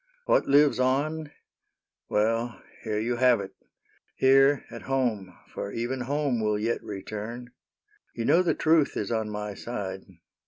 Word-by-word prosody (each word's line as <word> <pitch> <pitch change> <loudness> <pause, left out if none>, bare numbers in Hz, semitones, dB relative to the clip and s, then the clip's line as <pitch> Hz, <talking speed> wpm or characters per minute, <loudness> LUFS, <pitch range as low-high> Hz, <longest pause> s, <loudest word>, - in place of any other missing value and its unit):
What - - +3
lives 145 -1 +4
on 145 +4 0 0.3
— - - -55
'' - - -61
Well, 115 +2 0 0.2
here 110 -1 -2
you 120 +3 -1
have 125 -2 +4
it: 95 -1 -6 0.6
here 135 +1 +4
at 115 - -8
home 115 -9 -2
— - - -31
For 100 - -5
even 120 +4 -3
home 140 -2 -1
will 105 -1 +1
yet 115 +3 -1
return. 110 +4 -7 0.6
You 115 - -3
know 175 - +5
the 180 - +1
truth 160 -2 +2
is 105 - -3
on 110 -2 -1
my 105 0 -4
side. 100 -3 -5
120 Hz, 160 wpm, -27 LUFS, 105-135 Hz, 0.6 s, know